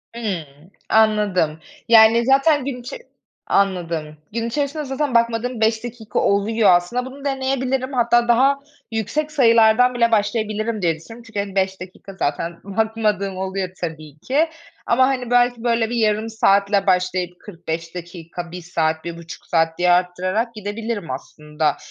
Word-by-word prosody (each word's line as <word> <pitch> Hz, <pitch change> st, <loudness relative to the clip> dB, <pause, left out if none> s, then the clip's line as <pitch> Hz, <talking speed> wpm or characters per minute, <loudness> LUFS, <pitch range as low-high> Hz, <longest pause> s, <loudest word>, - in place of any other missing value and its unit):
Imm, 200 Hz, -9 st, -3 dB, 0.4 s
anladım. 210 Hz, -8 st, +2 dB, 0.3 s
Yani, 230 Hz, +1 st, +7 dB
zaten 275 Hz, +2 st, +3 dB
gün 265 Hz, -3 st, -4 dB
içe 250 Hz, -, -7 dB, 0.5 s
anladım. 170 Hz, -6 st, -1 dB, 0.2 s
Gün 230 Hz, 0 st, -2 dB
içerisinde 290 Hz, +4 st, -2 dB
zaten 270 Hz, -1 st, -2 dB
bakmadığım 235 Hz, +1 st, +1 dB
5 220 Hz, 0 st, +2 dB
dakika 230 Hz, -3 st, -4 dB
oluyor. 205 Hz, +1 st, +2 dB
Aslında 205 Hz, +9 st, -1 dB
bunu 275 Hz, +2 st, -10 dB
deneyebilirim, 265 Hz, -1 st, -1 dB
hatta 240 Hz, -1 st, +3 dB
daha 265 Hz, +4 st, +4 dB, 0.3 s
yüksek 295 Hz, +8 st, -2 dB
sayılardan 235 Hz, -2 st, +5 dB
bile 235 Hz, -1 st, +2 dB
başlayabilirim 215 Hz, 0 st, 0 dB
diye 165 Hz, -2 st, +1 dB
düşünüyorum, 225 Hz, +9 st, -13 dB
çünkü, 220 Hz, -2 st, -5 dB
hani, 200 Hz, -1 st, -4 dB
5 190 Hz, -1 st, 0 dB
dakika 190 Hz, +1 st, -10 dB
zaten 170 Hz, 0 st, -3 dB
bakmadığım 210 Hz, -2 st, -1 dB
oluyor 190 Hz, 0 st, -3 dB
tabii 155 Hz, -3 st, -6 dB
ki. 290 Hz, -, +1 dB, 0.4 s
Ama, 255 Hz, +2 st, +4 dB
hani, 255 Hz, -3 st, -2 dB
belki, 245 Hz, -1 st, +3 dB
böyle, 230 Hz, -2 st, +1 dB
bir 240 Hz, -, -3 dB
yarım 220 Hz, -1 st, +1 dB
saatle 200 Hz, -2 st, +2 dB
başlayıp 180 Hz, -1 st, 0 dB
45 165 Hz, -3 st, -6 dB
dakika, 175 Hz, 0 st, -8 dB
1 180 Hz, +1 st, -7 dB
saat, 160 Hz, -2 st, -1 dB
1.5 170 Hz, 0 st, -8 dB
saat 165 Hz, -1 st, +1 dB
diye 180 Hz, 0 st, +3 dB
arttırarak 185 Hz, +6 st, 0 dB
gidebilirim 210 Hz, -, -4 dB
aslında. 150 Hz, +3 st, -3 dB
215 Hz, 140 wpm, -21 LUFS, 180-240 Hz, 0.5 s, Yani